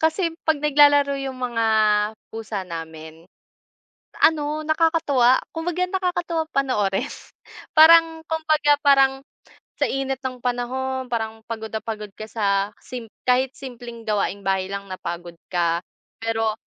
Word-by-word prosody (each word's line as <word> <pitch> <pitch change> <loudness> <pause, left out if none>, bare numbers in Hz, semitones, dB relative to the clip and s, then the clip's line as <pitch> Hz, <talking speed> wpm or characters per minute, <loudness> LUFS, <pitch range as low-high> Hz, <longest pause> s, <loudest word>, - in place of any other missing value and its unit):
kasi 325 +2 +1
kapag 315 -2 -1
naglalaro 290 -1 +5
yung 270 -1 -5
mga 240 -3 -1 0.7
pusa 220 -3 -5
namin, 160 -1 -9 0.9
ano 305 -1 +2
nakakatuwa. 310 -6 +3 0.2
Kumbaga 350 +2 -1
nakakatuwang 350 -3 -2
panoorin. 210 -9 0 0.6
Parang 325 0 +6
kumbaga, 310 -2 +2
parang 270 -2 +4 0.5
sa - - 0
init 270 0 -2
ng 255 -1 -4
panahon, 255 +1 -3
parang 220 -1 -3
pagod 220 -1 -5
na 220 - -2
pagod 210 -3 -6
ka 215 0 -9
sa 200 -2 0
sim 240 -3 -9 0.2
kahit 255 +1 +3
simpleng 240 -3 -9
gawaing 200 -2 -1
bahay 190 0 0
lang 200 0 -5
napagod 175 -2 -6 0.2
ka. 170 -1 +1 0.4
Pero 225 -1 0
255 Hz, 120 wpm, -23 LUFS, 215-300 Hz, 0.9 s, Parang